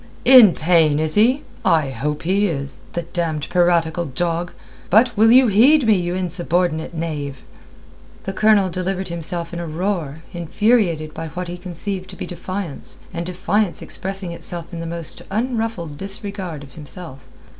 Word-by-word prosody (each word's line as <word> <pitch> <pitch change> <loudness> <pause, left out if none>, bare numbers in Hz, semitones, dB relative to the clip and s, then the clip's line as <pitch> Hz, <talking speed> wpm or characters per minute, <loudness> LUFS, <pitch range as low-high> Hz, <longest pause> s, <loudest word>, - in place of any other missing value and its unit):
"In 250 -8 +9
pain, 160 -3 +3
is 155 0 0
he? 245 +7 +3 0.2
I 155 -5 +2
hope 150 +4 -3
he 195 +4 +2
is, 140 -5 -4
the 170 - -2
damned 165 -3 -3
piratical 175 -1 +2
dog. 170 +4 -2 0.4
But 230 +4 +4
will 225 +2 +5
you 260 +2 +7
heed 245 +7 +5
me, 220 - +5
you 175 -1 -1
insubordinate 175 -2 -1
knave?" 145 -5 -4 0.8
The 195 - -4
Colonel 205 -2 +3
delivered 185 +1 -3
himself 170 0 -4
in 170 - -4
a 170 - -4
roar, 160 -3 -3
infuriated 175 -2 +1
by 165 0 -5
what 180 +3 -6
he 175 - -4
conceived 185 +2 -5
to - - -9
be - - -5
defiance, 185 -3 -6 0.2
and 170 0 -4
defiance 195 +2 0
expressing 190 -2 -4
itself 170 0 -5
in 170 - -5
the 165 - -5
most 170 -1 -4
unruffled 220 - -2
disregard 195 -6 -3
of 135 -2 -14
himself. 150 -4 -9
175 Hz, 155 wpm, -20 LUFS, 160-195 Hz, 0.8 s, In